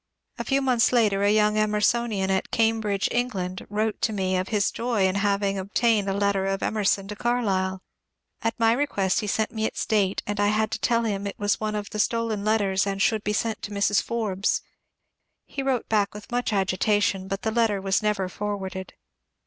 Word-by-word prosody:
A - - -1
few 275 0 +1
months 245 -3 +3
later 215 -5 +3
a 205 0 +4
young 210 0 +3
Emersonian 210 -1 +1
at 190 - 0
Cambridge 220 -3 +1
(England) 190 -7 -2
wrote 215 +1 -1
to 220 - +1
me 190 -3 -1
of 185 0 -1
his 210 -2 +1
joy 230 -4 0
in 190 - +2
having 200 0 0
obtained 205 +1 +1
a - - 0
letter 200 -1 +1
of 195 0 -2
Emerson 200 -2 +1
to 210 - -6
Carlyle. 195 -6 0 0.6
At 225 +1 -2
my 225 0 +4
request 205 -8 0
he 210 - -3
sent 220 +2 0
me 220 -2 -2
its - - -4
date, 200 -3 +1
and 205 0 -3
I 205 - +3
had 215 +1 +1
to - - -2
tell 235 -1 +2
him 200 -3 -2
it 200 - -6
was 205 0 0
one 215 -1 -2
of 205 -1 -4
the 210 - -4
stolen 230 -2 0
letters 205 -2 +1
and 195 0 -2
should 215 +1 +2
be 210 - -1
sent 220 0 -1
to 200 - -5
Mrs. 205 -1 +2
Forbes. 210 -4 -1 0.8
He 275 - -5
wrote 265 -3 -1
back 210 -2 +1
with 210 +2 -10
much 245 -1 0
agitation, 195 0 +1
but 195 +1 -4
the 220 - 0
letter 220 -3 +2
was 190 +1 +1
never 210 -3 0
forwarded. 190 -1 -5
205 Hz, 200 wpm, -25 LUFS, 195-220 Hz, 0.8 s, a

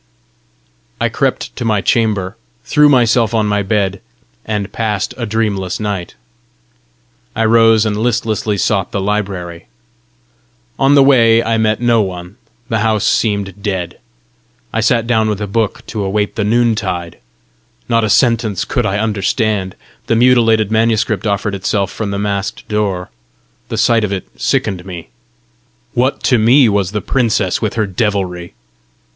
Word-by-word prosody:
I - - +1
crept - - -2
to - - -3
my 110 -3 +1
chamber, 105 -5 0 0.3
threw 150 0 +4
myself 120 -3 +3
on 110 -1 +2
my 105 0 0
bed, 100 -1 -1 0.4
and 105 -2 -3
passed 105 -4 -2
a 120 -3 -4
dreamless 105 -4 -1
night. 100 -5 -4 1.2
I 115 0 +1
rose, 115 -1 +4
and 105 -1 0
listlessly 110 -2 -1
sought 95 -2 0
the 100 - -2
library. 95 -4 -3 1.1
On 135 +1 +4
the 140 - +7
way 115 -4 +5
I 115 0 0
met 110 0 +1
no 120 -2 +3
one; 90 0 -6 0.3
the 110 - -1
house 110 -2 +1
seemed 100 -2 0
dead. 95 -4 -3 0.7
I 115 - 0
sat 115 +1 +2
down 110 -2 +1
with 105 -2 -2
a 105 - -2
book 105 +1 -2
to 105 -3 -4
await 105 +1 -1
the 110 - -1
noontide: 105 -6 0 0.7
not 115 -1 +2
a 110 - 0
sentence 115 -5 +2
could - - -1
I 95 - -1
understand! 105 -2 -1 0.3
The 115 - +2
mutilated 115 -3 +3
manuscript 110 -2 +1
offered 100 0 -1
itself 100 0 -1
from 110 -2 -4
the 100 - -3
masked 100 -1 -3
door: 100 -4 -2 0.6
the 115 - -3
sight 115 +1 +3
of 105 - -2
it 95 -2 -4
sickened 95 -4 -1
me; 90 -3 -9 0.8
what 130 +3 0
to 125 -3 +3
me 125 +4 +5
was 100 -3 0
the 105 -1 -2
princess 110 -8 0
with 110 -3 -2
her 110 -2 +1
devilry! 95 -3 -2
105 Hz, 150 wpm, -15 LUFS, 100-115 Hz, 1.2 s, the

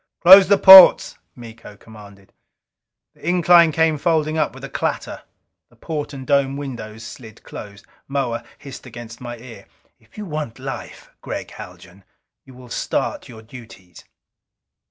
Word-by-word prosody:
"Close 190 +2 +8
the 200 +1 +3
ports!" 190 -1 +7 0.2
Miko 115 -3 -14
commanded. 100 -3 -17 0.8
The - - -26
incline 175 -2 +3
came 160 -1 0
folding 155 -1 -1
up 155 -2 -2
with - - -14
a - - -6
clatter. - - -5 0.5
The - - -26
port 150 -2 -7
and 135 -2 -10
dome 140 0 -1
windows 115 -6 -9
slid 110 -1 -13
closed. 100 -1 -12 0.2
Moa 130 -4 -4
hissed 140 -2 -13
against 115 -1 -12
my 120 -1 -9
ear: 115 0 -15 0.3
"If 110 - -26
you 210 - -7
want 150 - -7
life, - - -10
Gregg - - -8
Haljan, 95 +2 -14 0.4
you 130 - -17
will 125 -1 -16
start - - -5
your 110 -2 -14
duties!" 110 -6 -16
130 Hz, 145 wpm, -19 LUFS, 110-155 Hz, 0.8 s, Close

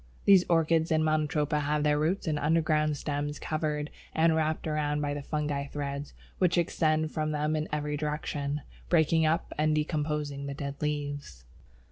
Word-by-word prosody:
These 195 -3 +7
Orchids 165 -1 +3
and 155 0 +3
Monotropa 150 -1 +1
have 150 +1 0
their 150 0 +3
roots 175 +7 0
and 155 -3 0
underground 155 -1 +2
stems 145 0 -3
covered 150 -1 -2 0.2
and 160 0 +4
wrapped 155 0 0
round 150 -1 0
by 145 -1 -1
the 145 - -4
fungus 145 -1 -2
threads, 140 0 -4 0.2
which 180 -2 +3
extend 155 -2 +1
from 155 -1 -1
them 150 +1 0
in 155 0 -2
every 150 0 -1
direction, 150 -1 -2 0.3
breaking 160 -1 +4
up 165 +3 0
and 155 0 +3
decomposing 150 -2 -2
the 140 - -4
dead 140 -1 -4
leaves. 145 - -3
150 Hz, 160 wpm, -29 LUFS, 145-155 Hz, 0.3 s, These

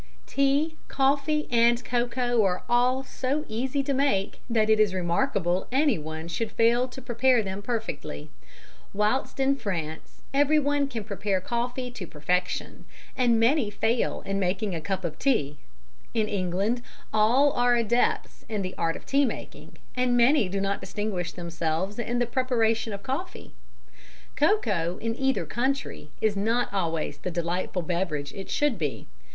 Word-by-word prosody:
_ - - -33
Tea, 280 +4 +1
coffee 280 +3 +1
and 235 +1 +4
cocoa 240 -1 +1
are 185 -2 0
all 250 +2 +3
so 275 +3 -2
easy 255 +5 -1
to 280 0 -1
make 230 -8 0
that 220 -2 +2
it 220 0 +4
is 205 -3 +3
remarkable 180 0 0
anyone 165 - 0
should 215 +6 -3
fail 235 +3 +3
to 260 +1 -10
prepare 245 -1 +3
them 190 0 -4
perfectly. 205 - -4 0.6
Whilst 210 +7 0
in 270 +1 +3
France 165 - -5
everyone 290 0 +3
can 235 -6 -5
prepare 200 -1 -1
coffee 245 +5 -3
to 200 -7 -7
perfection, 180 +5 -2 0.3
and 240 -3 +3
many 235 0 +3
fail 225 +3 0
in 195 0 -1
making 195 +2 0
a 165 - -3
cup 190 +2 -2
of 155 -2 -4
tea, 150 - +1 0.6
in 220 -2 +2
England 200 +4 0 0.3
all 240 +7 +4
are 245 0 +3
adepts 235 +1 0
in 210 -3 -1
the 185 0 -4
art 165 -1 +1
of - - -10
tea 280 +1 +3
making, 250 - -5 0.2
and 250 -1 +2
many 240 -3 +4
do 195 +2 -2
not 195 0 -1
distinguish 205 -5 -3
themselves 170 +3 -2
in 235 +1 -1
the 245 - +2
preparation 230 -3 +1
of 200 -1 -6
coffee. - - -5 0.8
Cocoa 205 - +1
in 225 0 -2
either 270 0 0
country 260 - -2
is 215 -2 +2
not 225 +3 0
always 165 -5 -1
the - - -4
delightful 175 +1 -2
beverage 160 -5 -2
it 195 - -7
should 290 -9 +1
be. 150 -4 -3
225 Hz, 155 wpm, -27 LUFS, 185-255 Hz, 0.8 s, and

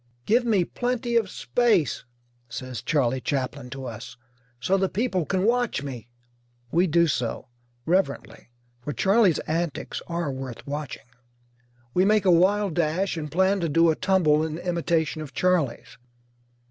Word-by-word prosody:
"Give 240 +3 +3
me 205 -7 +2
plenty 245 +1 -2
of 225 -4 +2
space," 220 - +1 0.4
says 125 +1 -6
Charley 130 -4 0
Chaplin 135 -1 -3
to 135 0 -7
us, 115 -1 -8 0.4
"so 185 +10 +1
the 190 -1 +1
people 195 -6 -1
can 190 0 0
watch 240 - +1
me." 125 -4 -7 0.6
We 175 +3 +3
do 170 +1 +4
so, 125 -8 -2 0.4
reverently, 170 -8 -1 0.3
for 145 +4 -4
Charley's 195 -2 +3
antics 165 0 -3
are 170 -4 -2
worth 130 -2 -7
watching. 145 -6 -5 0.9
We 180 - +3
make 210 0 +3
a 185 - +6
wild 190 +2 +3
dash, 170 +4 0
and 150 -3 -5
plan 190 +4 +2
to 170 -2 -1
do 165 +2 +4
a - - -1
tumble 175 -5 +2
in 160 0 -3
imitation 170 -3 -1
of 150 -3 -9
Charley's. 170 -14 0
170 Hz, 145 wpm, -25 LUFS, 145-190 Hz, 0.9 s, a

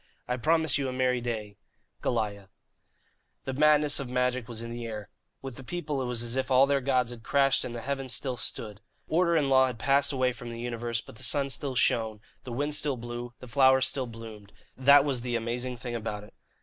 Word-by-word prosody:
"I 125 - 0
promise 160 +2 +2
you 135 -2 -1
a - - -3
merry 125 -1 +1
day, 110 -4 -4 0.4
"GOLIAH." 100 -4 -2 1.0
The 130 - -3
madness 150 +1 +4
of 135 -3 -5
magic 125 -1 0
was 115 -2 -5
in 115 - -6
the 120 0 -5
air. 105 -2 -7 0.3
With 135 -3 -7
the 135 - -9
people 150 -2 -3
it - - -2
was 120 -1 -1
as 120 +1 -2
if 130 +1 -1
all 130 +1 +6
their 140 0 +1
gods 125 -2 +1
had 120 -2 -9
crashed 135 +2 +2
and 120 - -5
the 120 - -5
heavens 135 +1 -3
still 130 +2 -1
stood. 110 -3 -2 0.3
Order 170 +1 +2
and 150 -4 +2
law 130 -1 +5
had 125 -3 -5
passed 135 +5 +2
away 130 -2 +1
from 120 0 -9
the 115 0 -7
universe; 120 -1 -3
but - - -14
the 130 - -10
sun 140 +3 +1
still 135 -1 -2
shone, 110 -3 +2 0.3
the 125 - -6
wind 145 +5 -1
still 145 -3 +1
blew, 120 +1 -6
the 125 - -9
flowers 130 +1 +5
still 130 -1 -1
bloomed 110 -3 -10 0.2
that 140 +2 +6
was 135 -4 -1
the 120 0 -2
amazing 120 +2 -3
thing 120 0 -6
about 105 -3 -4
it. 105 - -15
125 Hz, 220 wpm, -28 LUFS, 115-135 Hz, 1.0 s, all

